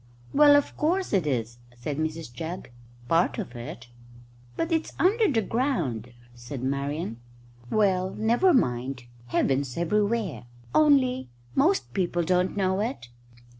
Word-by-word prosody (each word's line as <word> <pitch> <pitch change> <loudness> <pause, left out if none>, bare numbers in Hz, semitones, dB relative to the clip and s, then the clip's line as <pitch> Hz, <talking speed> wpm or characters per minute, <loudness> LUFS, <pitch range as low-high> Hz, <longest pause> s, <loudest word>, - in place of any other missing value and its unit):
"Well, 290 0 +7
of 285 - +1
course 360 - 0
it 185 -6 +2
is," 120 -3 -2 0.2
said 140 +4 -4
Mrs 155 -4 -3
Jugg 160 +2 -6 0.4
"part 165 +5 +2
of 120 - -5
it." 120 +2 -7 0.7
"But 330 - -1
it's 320 -1 0
under 415 +1 +3
the 225 -4 +1
ground," 190 - -1 0.2
said 120 +2 -7
Marian. 140 -2 -2 0.5
"Well, 190 -3 +2
never 235 - +3
mind. 125 - 0 0.2
Heaven's 135 +1 0
everywhere, 200 - 0 0.3
only 260 - +3 0.2
most 355 +8 +2
people 175 -2 0
don't 180 +3 +1
know 190 -1 +1
it." 220 - -3
180 Hz, 130 wpm, -26 LUFS, -, 0.7 s, Well